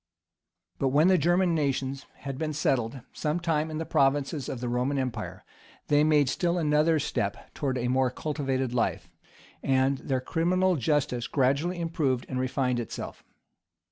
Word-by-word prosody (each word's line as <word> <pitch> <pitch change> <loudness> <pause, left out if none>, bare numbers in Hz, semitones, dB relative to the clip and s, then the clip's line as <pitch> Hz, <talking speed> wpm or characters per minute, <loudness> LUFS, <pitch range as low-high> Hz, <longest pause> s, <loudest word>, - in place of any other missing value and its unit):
[*] - - -50
But 135 - +2
when 150 +7 +4
the 185 - +5
German 175 +3 +3
nations 135 -3 -1
had 135 -1 -5
been 155 -1 -2
settled 130 -3 0
some 155 +2 -1
time 160 -2 0
in 155 - -4
the 160 - -3
provinces 140 +1 +1
of 125 - -4
the 125 - -3
Roman 125 +4 0
empire, 110 -9 -4 0.4
they 145 0 +5
made 150 -3 +4
still 175 +6 0
another 155 0 +3
step 105 -8 -3
towards 135 -3 -1
a 120 0 -1
more 130 +1 +2
cultivated 135 -2 -2
life, 120 - -1 0.5
and 135 0 +2
their 130 -2 -1
criminal 180 +7 +1
justice 135 -3 0
gradually 145 +6 +1
improved 150 -7 0
and 130 - -3
refined 130 -1 0
itself. 120 - -6
140 Hz, 160 wpm, -28 LUFS, 130-155 Hz, 0.5 s, the